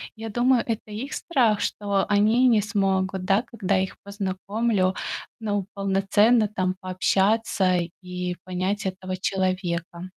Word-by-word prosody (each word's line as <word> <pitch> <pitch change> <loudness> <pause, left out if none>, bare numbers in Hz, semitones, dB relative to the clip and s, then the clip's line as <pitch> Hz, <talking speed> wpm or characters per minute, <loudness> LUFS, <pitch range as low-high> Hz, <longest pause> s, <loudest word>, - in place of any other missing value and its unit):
Я 225 0 -6
думаю, 240 +2 +3
это 220 -2 -4
их 240 +7 -5
страх, 240 -10 +2
что 200 -1 0
они 215 +5 +4
не 225 -4 +4
смогут, 190 -2 0
да, 195 +4 +3
когда 200 -4 0
я 190 - +2
их 190 - -6
познакомлю. 200 0 -1 0.5
Ну 205 -3 -1
полноценно 200 +3 +3
там 185 -3 -1
пообщаться 190 0 +1 0.2
и 180 -1 -4
понять 185 +3 -2
этого 185 0 -4
человека. 185 -2 -2
195 Hz, 130 wpm, -25 LUFS, 185-215 Hz, 0.5 s, они